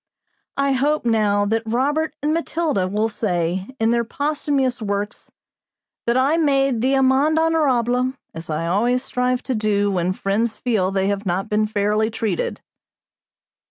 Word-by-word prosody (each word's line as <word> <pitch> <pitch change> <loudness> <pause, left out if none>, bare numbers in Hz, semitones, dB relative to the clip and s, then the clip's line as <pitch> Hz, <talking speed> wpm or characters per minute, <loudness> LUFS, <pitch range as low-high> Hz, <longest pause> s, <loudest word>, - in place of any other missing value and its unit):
I 275 0 +2
hope, 285 +2 +1
now, 210 -3 +2
that 225 +2 0
Robert 290 +8 0
and 300 +1 +1
Matilda 320 - -1
will 210 +3 0
say, 185 -3 -2
in 225 +1 +2
their 235 0 +2
posthumous 280 -1 -1
works, 205 0 -4 0.8
that 235 +1 +2
I 275 +5 +3
made 275 -6 +2
the 265 +2 +2
amende 270 +4 +3
honorable, 260 -6 +2 0.2
as 165 0 -8
I 155 +1 -2
always 235 +8 +1
strive 250 -1 -1
to 260 - -2
do 205 -2 +1
when 180 -1 0
friends 215 +4 -1
feel 215 -7 0
they 195 0 0
have 200 0 -2
not 185 +2 -1
been 215 0 +1
fairly 210 +1 +1
treated. 230 - -2
235 Hz, 150 wpm, -21 LUFS, 205-270 Hz, 0.8 s, I